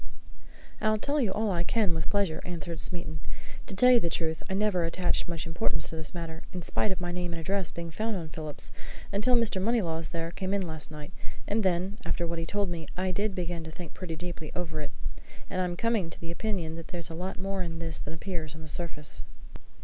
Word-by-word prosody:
"I'll 215 0 +5
tell 285 +6 +2
you 220 -6 +3
all 210 +1 +2
I 170 -2 +2
can, 205 -1 +3
with 160 -1 0
pleasure," 200 -6 +2
answered 170 -2 -3
Smeaton. 165 -2 -2 0.5
"To 195 - -4
tell 250 +6 +9
you 245 - +9
the 170 - +1
truth, 160 -1 0
I 190 - +1
never 200 -3 +4
attached 175 +2 +2
much 170 -2 -2
importance 165 0 +1
to - - -4
this 160 +1 -5
matter, 165 -1 -4
in 180 -2 -3
spite 210 - +2
of 190 - 0
my 175 -1 -1
name 175 -1 -1
and 165 - -2
address 190 +1 +1
being 170 -1 -4
found 220 +5 0
on 165 -4 -3
Phillips, 155 -1 -4 0.4
until 210 +5 +5
Mr. 225 -5 +4
Moneylaws 175 -7 +2
there 165 -1 -2
came 190 +2 0
in 200 - +2
last 160 -2 -5
night 150 +2 -7 0.4
and 215 +2 +3
then, 190 +2 +2
after 170 0 +1
what 170 0 -1
he 165 - -2
told 200 -1 +1
me, 165 -3 -3
I 185 0 +2
did 205 +2 +1
begin 175 -2 -1
to 160 - -6
think 165 0 -7
pretty 175 -3 -4
deeply 165 -2 -4
over 160 -3 -1
it, 145 - -2 0.6
and 185 - +2
I'm 175 -1 0
coming 225 -6 +2
to - - -8
the 170 0 -4
opinion 170 -4 -1
that 165 - -6
there's 170 -3 -3
a - - -4
lot 180 +3 -3
more 195 +1 -1
in 170 -2 -1
all - - -4
this 165 -2 -1
than 150 - -4
appears 160 -3 -3
on 160 - -8
the - - -7
surface." 150 -2 -4
175 Hz, 235 wpm, -31 LUFS, 165-195 Hz, 0.6 s, tell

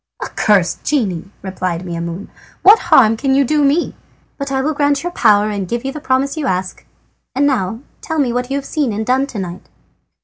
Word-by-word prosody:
"Accursed 195 -5 +1
genie!" 200 - -1
replied 185 -2 -3
Maimoune, 170 +2 -5 0.3
"what 410 +4 +8
harm 225 -3 +6
can 265 +3 0
you 275 0 +3
do 300 +3 +1
me? 285 +5 +1 0.5
But 280 0 -4
I 265 - 0
will 300 +4 0
grant 285 0 +1
your 350 - -3
power 210 -8 +3
and 200 -3 -3
give 235 +4 -3
the 270 +3 -4
promise 270 +1 0
you 295 -3 -2
ask. 185 -1 -3 0.5
And 280 +2 +2
now 225 -5 0 0.2
tell 320 - -4
me 260 -5 +1
what 250 +1 -2
you 275 - -1
have 280 - -5
seen 285 -8 -1
and 215 +2 -3
done 260 +3 +1
to 245 - -8
night." 180 -2 -6
250 Hz, 200 wpm, -17 LUFS, 195-280 Hz, 0.5 s, what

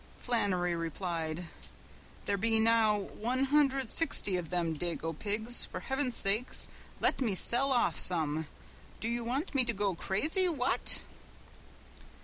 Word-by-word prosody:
Flannery 190 -7 -1
replied: 165 0 -4 0.8
"There 200 - 0
be 225 +3 +1
now 220 -1 +3
one 235 +6 -3
hundred 275 -3 +1
sixty 275 - +3
of 175 -3 -4
them 170 -2 -2
dago 165 0 -3
pigs, 215 +7 0
for - - -8
heavens 265 -2 -2
sake 210 +6 +3 0.5
let - - +1
me 220 -7 0
sell 255 +8 +3
off 245 -2 +1
some, 160 -3 +2 0.5
do 220 - -3
you 235 0 -2
want 270 +10 -3
me 270 -2 +3
to 235 -1 -1
go 200 -2 -1
crazy, 310 - 0
what." 265 -6 +1
220 Hz, 135 wpm, -30 LUFS, 180-255 Hz, 0.8 s, now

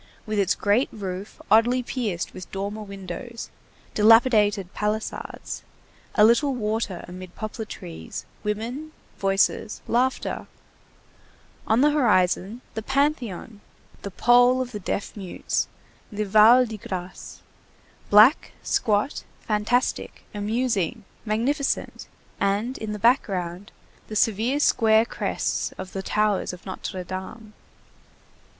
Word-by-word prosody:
with 215 -1 -1
its 195 -2 +2
great 215 +6 +2
roof 195 -1 -6
oddly 240 +4 +4
pierced 215 -9 -3
with 185 -3 -10
dormer 200 +2 -4
windows, 200 +3 -7 0.4
dilapidated 210 -3 +4
palisades, 210 +1 -4 0.5
a 210 - +7
little 260 +4 +3
water 215 -4 -2
amid 185 0 -10
poplar 220 +1 -5
trees, 80 - -8 0.2
women, 235 +9 -4 0.3
voices, 195 +2 +1
laughter; 255 +2 0 1.2
on 220 +3 +3
the 295 +1 +5
horizon 210 -4 +2
the 220 - -3
Panthéon, 250 - -1 0.4
the 200 - -5
pole 245 +5 +4
of 255 -1 -3
the 210 - -5
Deaf 195 +1 -3
Mutes, 195 -4 -2 0.4
the 210 0 -2
Val 220 +5 +7
de 220 -2 -7
Grâce, 185 -1 -7 0.7
black, 215 +8 +6
squat, 215 +6 0 0.2
fantastic, 220 +4 -1
amusing, 215 -1 -1 0.2
magnificent, 260 +7 -1 0.3
and 205 +6 0
in 215 -1 -4
the - - -4
background, 195 -5 0 0.4
the 215 - -7
severe 225 +6 +2
square 220 -5 +4
crests - - -2
of 185 0 -8
the 195 - -3
towers 210 -1 0
of 180 - -11
Notre 185 -1 -5
Dame. 190 +5 -7
215 Hz, 115 wpm, -24 LUFS, 195-240 Hz, 1.2 s, a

